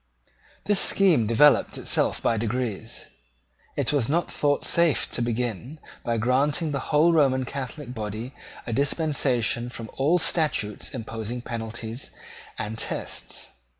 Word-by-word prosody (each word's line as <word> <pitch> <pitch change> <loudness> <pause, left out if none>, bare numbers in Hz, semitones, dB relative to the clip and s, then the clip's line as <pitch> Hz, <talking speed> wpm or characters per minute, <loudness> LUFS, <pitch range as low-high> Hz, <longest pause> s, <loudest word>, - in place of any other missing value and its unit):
This 205 -1 +4
scheme 170 - +4
developed 140 +6 +4
itself - - 0
by 115 - +2
degrees. 115 0 -3 0.7
It - - +1
was 140 -5 +1
not 170 +4 0
thought 145 -1 +1
safe 170 -4 +2
to - - -2
begin 120 - -2 0.3
by 115 -1 0
granting 140 +7 +1
to - - -3
the 140 - -1
whole 160 +3 +5
Roman 135 -5 +3
Catholic 135 0 -6
body 110 +3 -5 0.3
a 115 - -3
dispensation 135 -4 +1
from 115 -3 -8
all 150 +6 +3
statutes 155 - 0
imposing 115 +1 -5
penalties 115 +1 -5 0.5
and 110 +2 -4
tests. - - -4
125 Hz, 130 wpm, -25 LUFS, 115-150 Hz, 0.7 s, whole